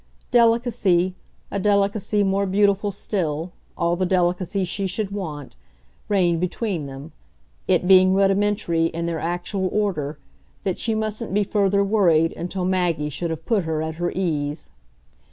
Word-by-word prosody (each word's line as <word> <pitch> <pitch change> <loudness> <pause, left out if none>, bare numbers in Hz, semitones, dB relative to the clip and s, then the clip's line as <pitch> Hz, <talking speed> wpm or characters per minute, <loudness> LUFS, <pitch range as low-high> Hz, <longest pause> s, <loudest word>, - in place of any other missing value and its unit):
Delicacy, 230 -6 +3 0.4
a 200 - -2
delicacy 205 +1 +1
more 195 0 +1
beautiful 200 +1 +2
still, 175 -4 -3 0.3
all 170 -1 +1
the 185 - -1
delicacy 180 +1 0
she 195 +2 -2
should 200 +1 -2
want, 155 -9 -6 0.5
reigned 175 -5 +2
between 180 -4 -2
them 135 +1 -9 0.6
it 180 - +2
being 185 0 +6
rudimentary, 195 -3 +2
in 165 +1 -2
their 170 -1 -2
actual 175 +3 -2
order, 160 -9 -1 0.5
that 190 -2 -2
she 225 -2 0
mustn't 215 -1 -3
be 205 - +3
further 200 0 +2
worried 175 -6 +3
until 180 +2 -4
Maggie 175 -5 0
should 170 +4 -3
have 160 -1 -5
put 220 -6 +1
her 160 -1 -1
at 160 0 -5
her 175 - 0
ease. 150 -5 -2
185 Hz, 145 wpm, -23 LUFS, 170-200 Hz, 0.6 s, being